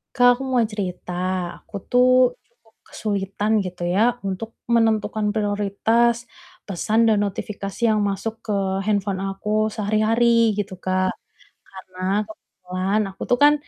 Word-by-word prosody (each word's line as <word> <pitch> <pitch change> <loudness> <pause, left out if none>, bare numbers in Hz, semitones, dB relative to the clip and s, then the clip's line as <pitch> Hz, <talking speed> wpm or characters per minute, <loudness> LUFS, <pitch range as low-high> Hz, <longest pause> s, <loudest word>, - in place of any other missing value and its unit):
Kak, 245 -1 +6
aku 270 - -7
mau 260 -2 +1
cerita. 190 -4 -5 0.5
Aku 200 - -7
tuh 250 0 +4
cukup 230 -2 -33
kesulitan 205 0 -1
gitu 180 -1 -4
ya 225 +7 +2
untuk 195 +4 -4 0.2
menentukan 220 -2 +1
prioritas 220 +3 +1 0.4
pesan 215 +4 +1
dan 210 -2 +3
notifikasi 200 0 -5
yang 215 -2 +2
masuk 220 +3 -3
ke 210 -3 -1 0.3
handphone 200 -2 -1
aku 210 +2 -1
sehari-hari 225 +2 +3
gitu, 195 -2 -3
Kak, 185 0 -1 0.5
karena 190 +2 -3
kebetulan 190 -1 -3
aku 195 0 -9
tuh 245 - +4
kan 290 +2 +6
210 Hz, 125 wpm, -22 LUFS, 195-230 Hz, 0.5 s, Kak